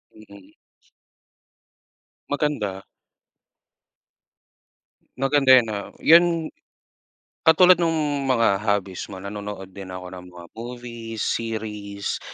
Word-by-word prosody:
Mm. 100 -3 -16 1.8
Maganda. 125 -10 -2 2.3
Maganda 135 +1 +2
'yan, 120 -2 +3
oo. 100 -1 -5
'Yan, 170 +2 +6 1.2
katulad 180 +2 +7
nung 150 -4 0
mga 115 -6 +2
hobbies 100 -3 -2
mo, 100 - -8
nanonood 100 0 -7
din 95 0 -9
ako 90 0 -7
ng 90 -1 -9
mga 90 -1 -12
movies, 115 -1 -7
series, 105 -3 -4
110 Hz, 90 wpm, -23 LUFS, 100-135 Hz, 2.3 s, katulad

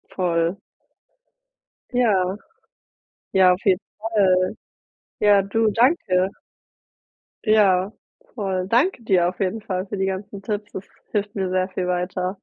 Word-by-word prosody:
Voll. 170 0 0 1.3
Ja. 205 -7 +1 1.0
Ja, 185 -1 +6
auf 180 - -5
jeden 185 -1 +4 0.2
Fall. 195 -4 +2 0.7
Ja, 205 -1 +5
du, 220 +3 +1
danke. 200 - +2 1.1
Ja, 200 -4 +3 0.4
voll, 190 -4 -2
danke 250 - +2
dir 185 -5 +3
auf 180 - -11
jeden 200 +3 -1
Fall 185 -2 -3
für 205 - -5
die 190 - 0
ganzen 195 +1 -5
Tipps, 210 0 -4
das 190 - -6 0.3
hilft 205 0 -2
mir 190 -2 -1
sehr 185 0 0
viel 185 -1 -3
weiter. 180 +1 -2
195 Hz, 125 wpm, -22 LUFS, 185-210 Hz, 1.3 s, Ja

